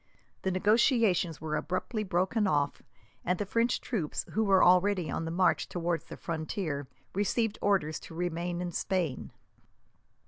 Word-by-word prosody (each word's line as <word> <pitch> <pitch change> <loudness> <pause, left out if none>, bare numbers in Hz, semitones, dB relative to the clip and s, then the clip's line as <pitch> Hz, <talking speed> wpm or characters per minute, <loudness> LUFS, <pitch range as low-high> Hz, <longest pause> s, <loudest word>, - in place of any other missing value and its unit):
The 190 - 0
negotiations 200 - +3
were 155 -1 -3
abruptly 185 +7 -2
broken 190 +3 +1
off, 145 -4 0 0.4
and 180 +1 0
the 205 - -2
French 230 +4 +1
troops, 185 - -3
who 220 - +1
were 195 -3 +5
already 180 -1 +4
on 165 - -2
the - - -3
march 170 -2 +2
towards 170 -1 -2
the - - -9
frontier, 155 -3 -3 0.3
received 205 +2 0
orders 180 -7 +1
to 160 - -11
remain 175 0 -2
in 175 -1 -3
Spain. 175 -6 -2
180 Hz, 145 wpm, -30 LUFS, 165-205 Hz, 0.4 s, were